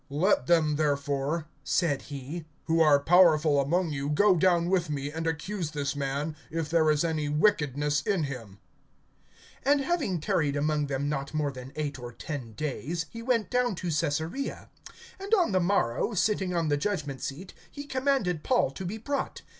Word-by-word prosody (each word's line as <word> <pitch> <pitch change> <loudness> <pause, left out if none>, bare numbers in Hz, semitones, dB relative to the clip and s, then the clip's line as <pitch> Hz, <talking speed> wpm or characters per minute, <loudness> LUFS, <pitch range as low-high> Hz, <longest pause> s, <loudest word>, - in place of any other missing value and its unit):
(5)Let 145 -2 +2
them 155 -3 +3
therefore, 145 +1 0 0.2
said 155 -6 +1
he, 145 +4 -7 0.2
who 165 0 +2
are 150 -3 +6
powerful 155 -3 +5
among 170 +4 0
you, 140 -1 -3
go 190 +6 +4
down 175 0 +3
with 180 -3 +1
me, 145 -1 -3
and 165 +1 -3
accuse 165 +2 -2
this 145 -2 -3
man, 140 +2 -2
if 165 -2 -3
there 160 -2 +4
is 150 0 +2
any 155 -3 -1
wickedness 150 - +2
in 185 +1 0
him. 120 -8 -6 1.1
(6)And 285 +1 +3
having 275 - 0
tarried 150 -1 0
among 150 0 0
them 140 +1 -2
not 140 0 -3
more 150 -2 0
than 130 0 -9
eight 145 -3 -3
or 120 -1 -7
ten 125 -2 -6
days, 155 +5 -3
he 230 - -7
went 230 -3 0
down 250 -4 +1
to 175 -1 -3
Caesarea; 160 - -2 0.5
and 400 +3 +2
on 360 - +2
the 185 - +3
morrow, 175 - +1
sitting 195 -1 +1
on 165 -2 +1
the 145 - +2
judgment 145 -6 -3
seat, 170 +8 -6 0.2
he 285 - -8
commanded 260 - 0
Paul 245 - +2
to 140 - -7
be 190 +5 -4
brought. 280 +5 -3
155 Hz, 175 wpm, -28 LUFS, 145-185 Hz, 1.1 s, are